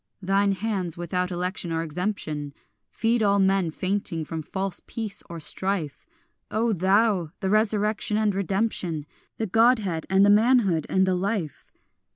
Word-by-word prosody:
Thine 195 +1 +2
hands, 190 -5 -2
without 180 +1 -2
election 180 -1 -3
or 165 0 -1
exemption, 155 -4 -4 0.3
Feed 230 +1 0
all 200 -1 +3
men 195 -3 +2
fainting 185 -2 -2
from 160 +1 -5
false 190 +3 -2
peace 220 -3 -5
or 170 -1 -6
strife, 185 - -3 0.4
O 225 +1 +1
thou, 190 -1 +2
the 190 - -1
resurrection 215 0 +1
and 215 -2 +2
redemption, 190 -5 -1 0.3
The 225 - -1
godhead 220 -6 +2
and 190 +1 +5
the 205 - +6
manhood 210 - +3
and 190 0 +3
the 185 - +1
life. 185 -3 -3
195 Hz, 145 wpm, -25 LUFS, 175-210 Hz, 0.4 s, the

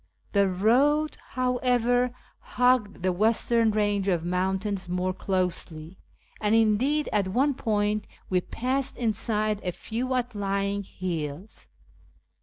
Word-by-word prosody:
The 200 -2 +3
road, 270 +11 +3 0.2
however, 250 -1 +1 0.4
huo;"ed 245 -7 +2
the 185 - +2
western 225 +3 +2
range 205 -2 +1
of 175 -4 +1
moun 185 +2 0
tains 195 -2 -4
more 180 +1 -1
closely, 180 -3 -2 0.4
and 210 +1 +2
indeed 235 +8 +2
at 205 -3 +2
one 265 +9 +2
point 210 -3 0 0.2
we 185 -1 +1
passed 255 +7 -2
inside 215 -2 -1
a 180 - -1
few 245 +8 -3
outlying 200 -4 -1
hills. 175 -1 -6
210 Hz, 115 wpm, -26 LUFS, 190-245 Hz, 0.4 s, The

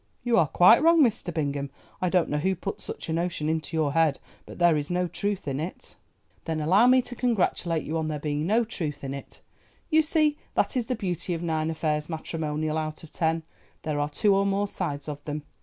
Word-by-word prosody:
"You 240 -1 +2
are 160 - +4
quite 180 - +6
wrong, 330 0 +6
Mr. 225 -7 0
Bingham; 140 -3 -2 0.3
I 180 - +2
don't 180 -2 +2
know 150 - -1
who 190 +5 +1
put 185 - -5
such - - -6
a 160 - -2
notion 165 -2 -1
into 160 +1 -2
your 150 -3 +1
head, 160 -3 +3 0.3
but - - -10
there 175 -2 +4
is 145 0 -2
no 180 0 0
truth 200 -1 -3
in 135 0 -2
it." 165 +4 -6 0.5
"Then 160 -1 -2
allow 190 +10 +4
me 255 0 +5
to 245 - -7
congratulate 185 -9 0
you 160 +1 -2
on 160 - -2
there 155 -1 -2
being 150 +1 -2
no 225 +4 +3
truth 160 -11 -4
in 135 0 -4
it. 140 - -10 0.5
You 315 0 +6
see 305 -1 +1 0.2
that - - +1
is 240 -3 0
the 250 - 0
beauty 180 -4 -2
of 165 - -5
nine 160 -1 0
affairs 155 -1 -1
matrimonial 155 -1 -2
out 155 0 -5
of 160 - -12
ten—there 160 -2 -3
are 145 0 0
two 200 +7 +2
or 195 0 +3
more 200 +1 +1
sides 150 -8 -4
of 145 -1 -6
them. 150 0 -4
165 Hz, 220 wpm, -26 LUFS, 150-195 Hz, 0.5 s, quite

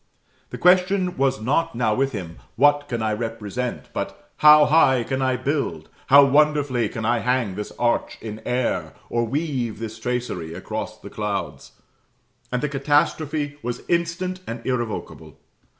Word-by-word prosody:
The - - -7
question 180 0 +3
was 135 -2 +1
not 140 +7 0
now 115 -3 +1
with 135 +4 0
him, 90 -7 -6 0.2
What 145 +3 +3
can 115 -3 -2
I 110 -1 0
represent? 115 +2 -4
but, - - -6
How 150 0 +8
high 135 -5 +4
can 135 +3 -2
I 130 -1 +1
build 125 - -2 0.2
how 140 +1 +8
wonderfully 140 -5 +2
can 110 -2 -5
I 120 +1 +2
hang 125 -4 0
this 105 +2 -6
arch 120 -1 0
in 110 -1 -7
air, 125 0 -1 0.2
or 120 0 +1
weave 135 -4 -2
this 110 0 -7
tracery 115 -10 -3
across - - -5
the - - -12
clouds? - - -4 0.8
And 125 +1 -1
the - - +2
catastrophe 145 +1 0
was 120 0 -4
instant 170 +2 -1
and 115 0 -6
irrevocable. 120 -4 -4
130 Hz, 150 wpm, -23 LUFS, 115-145 Hz, 0.8 s, How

